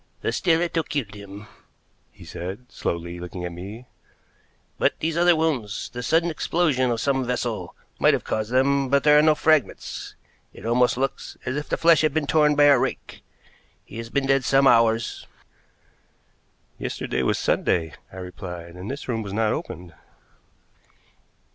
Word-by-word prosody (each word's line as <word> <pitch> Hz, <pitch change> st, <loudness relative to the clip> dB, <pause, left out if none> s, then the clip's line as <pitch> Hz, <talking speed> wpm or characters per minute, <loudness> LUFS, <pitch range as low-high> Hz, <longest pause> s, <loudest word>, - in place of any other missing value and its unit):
"The -, -, -1 dB
stiletto 170 Hz, -1 st, +1 dB
killed 140 Hz, -9 st, -4 dB
him," 100 Hz, 0 st, -10 dB, 0.7 s
he -, -, -15 dB
said, 95 Hz, +8 st, -7 dB
slowly, 85 Hz, +1 st, -4 dB
looking 90 Hz, 0 st, -6 dB
at 90 Hz, -, -4 dB
me, 100 Hz, +8 st, -9 dB, 0.9 s
"but -, -, +2 dB
these 160 Hz, 0 st, -2 dB
other 175 Hz, 0 st, +5 dB
wounds 140 Hz, -11 st, -2 dB
the 125 Hz, -, -5 dB
sudden 165 Hz, +7 st, +2 dB
explosion 150 Hz, -5 st, +1 dB
of 115 Hz, -1 st, -1 dB
some 135 Hz, +1 st, +1 dB
vessel 120 Hz, -7 st, -3 dB, 0.2 s
might -, -, +5 dB
have -, -, -5 dB
caused 110 Hz, +1 st, -3 dB
them, 135 Hz, +1 st, +2 dB
but 140 Hz, +1 st, +3 dB
there 150 Hz, 0 st, +6 dB
are -, -, +6 dB
no 155 Hz, 0 st, +4 dB
fragments. 155 Hz, -7 st, 0 dB, 0.4 s
It -, -, -12 dB
almost 120 Hz, +1 st, +2 dB
looks 135 Hz, +1 st, -3 dB
as 130 Hz, +1 st, -2 dB
if 150 Hz, 0 st, -4 dB
the -, -, 0 dB
flesh 165 Hz, -1 st, +5 dB
had 155 Hz, -2 st, +1 dB
been 155 Hz, -2 st, +1 dB
torn 150 Hz, 0 st, +3 dB
by 145 Hz, -, +5 dB
a 145 Hz, -3 st, +6 dB
rake. 130 Hz, +1 st, -4 dB, 0.6 s
He -, -, -10 dB
has 115 Hz, 0 st, -6 dB
been 140 Hz, +2 st, 0 dB
dead 135 Hz, -1 st, +2 dB
some 135 Hz, +2 st, +3 dB
hours." 115 Hz, -3 st, +3 dB, 1.5 s
"Yesterday -, -, -3 dB
was -, -, +1 dB
Sunday," 80 Hz, -3 st, 0 dB, 0.2 s
I 95 Hz, -, -12 dB
replied, 90 Hz, -2 st, -8 dB
"and 90 Hz, +3 st, -8 dB
this 140 Hz, +2 st, -6 dB
room 115 Hz, -3 st, -1 dB
was 100 Hz, -2 st, -6 dB
not 110 Hz, 0 st, +1 dB
opened." 85 Hz, 0 st, -7 dB
125 Hz, 165 wpm, -24 LUFS, 100-150 Hz, 1.5 s, there